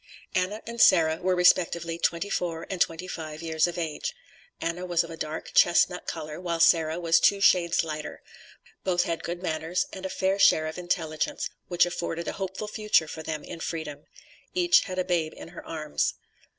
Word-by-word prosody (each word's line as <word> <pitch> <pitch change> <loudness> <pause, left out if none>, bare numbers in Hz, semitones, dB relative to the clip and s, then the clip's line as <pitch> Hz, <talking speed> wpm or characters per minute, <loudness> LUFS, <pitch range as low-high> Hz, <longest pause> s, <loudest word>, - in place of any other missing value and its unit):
Anna 190 +3 -1
and 235 0 -3
Sarah 160 -3 +5
were 185 0 +2
respectively 170 -2 +3
twenty 170 +5 0
four 165 -2 -2
and 185 -2 -4
twenty 165 +3 0
five 155 -2 -6
years 160 0 +1
of 175 - -5
age; 170 - -3 0.4
Anna 170 +2 -3
was 175 -2 +1
of 165 - -9
a - - -6
dark 155 0 -5
chestnut 180 +1 +4
color, 155 0 -5
while 170 -2 -2
Sarah 165 -1 +4
was 165 -1 +4
two 200 - +4
shades 175 -4 +4
lighter; 155 -1 -6 0.6
both 175 -2 +2
had 170 -1 -3
good 175 +1 -5
manners, 160 +1 -1
and 190 - -8
a 190 - -3
fair 190 +1 0
share 155 -4 +5
of 155 +3 -5
intelligence, 160 -3 -2 0.2
which 175 -1 +3
afforded 170 -1 -4
a - - 0
hopeful 190 +2 -4
future 210 -6 +2
for 160 - -7
them 155 -1 -4
in 170 - -8
freedom. 150 -3 -5 0.5
Each 350 -1 +4
had 185 -2 -6
a 185 - 0
babe 170 -3 0
in - - -9
her 175 - -10
arms. 155 -2 -2
170 Hz, 190 wpm, -27 LUFS, 160-185 Hz, 0.6 s, Sarah